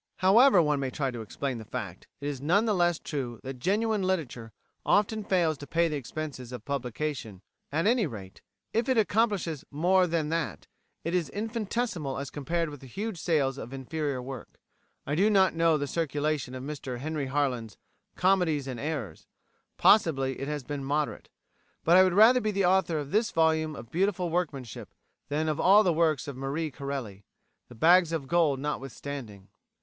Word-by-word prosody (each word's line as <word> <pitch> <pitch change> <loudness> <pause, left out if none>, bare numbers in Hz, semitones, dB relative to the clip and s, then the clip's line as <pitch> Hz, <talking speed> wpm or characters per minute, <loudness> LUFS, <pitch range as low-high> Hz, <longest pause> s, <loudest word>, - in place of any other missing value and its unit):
However 200 0 +6
one 150 -2 +1
may 135 -1 -1
try 135 0 -2
to 120 -2 -6
explain 125 +3 -4
the - - -8
fact, - - -7
it 140 - -3
is 140 -3 -4
none 180 +10 +3
the 215 - +2
less 175 -3 +2
true 125 -9 -5
that 130 -1 -7
genuine 210 - +1
literature 150 -12 -2 0.3
often 210 +1 +2
fails 170 -7 +1
to 145 - -9
pay 170 0 +2
the 155 - -3
expenses 140 -2 -6
of 125 - -8
publication; 130 -6 -4 0.3
at 160 +5 0
any 225 -3 +3
rate, 100 -7 -10 0.3
if 230 +4 0
it 260 - +2
accomplishes 205 - +1
more 180 +5 +3
than 160 -2 -1
that, 165 0 -2 0.4
it 165 - -2
is 180 -3 0
infinitesimal 215 - -3
as 140 -1 -5
compared 165 +2 -2
with 145 - -9
the 135 - -12
huge 200 - -5
sales 140 -5 +1
of 120 - -8
inferior 135 0 -3
work. 130 0 -9 0.5
I 145 - -2
do 195 +7 +3
not 195 -3 +4
know 165 -1 +3
the 145 - -2
circulation 145 -3 -2
of 130 - -6
Mr 140 -3 -5
Henry 150 +1 -3
Harland's 130 -6 -1 0.4
"Comedies 180 -6 +2
and 130 -3 -5
Errors" 135 - -5 0.5
possibly 135 -10 +3
it 135 - -4
has 150 -2 -3
been 140 +2 -5
moderate 145 +2 -2 0.5
but 170 - +5
I 185 - +9
would 185 -1 +2
rather 235 +5 +7
be 215 - 0
the 200 -2 +1
author 180 -3 +2
of 145 -1 -5
this 215 +1 +2
volume 160 -1 +1
of 115 -2 -10
beautiful 180 -1 0
workmanship 145 - -4 0.3
than 155 +2 0
of 155 -1 -1
all 205 +3 +6
the 180 -4 +2
works 160 -2 +1
of 140 - -5
Marie 140 +4 -3
Corelli 130 -8 -6 0.5
the 120 - -12
bags 170 +6 +5
of 155 -5 -3
gold 160 -4 +2
notwithstanding. 135 -7 -6
155 Hz, 180 wpm, -28 LUFS, 135-180 Hz, 0.5 s, I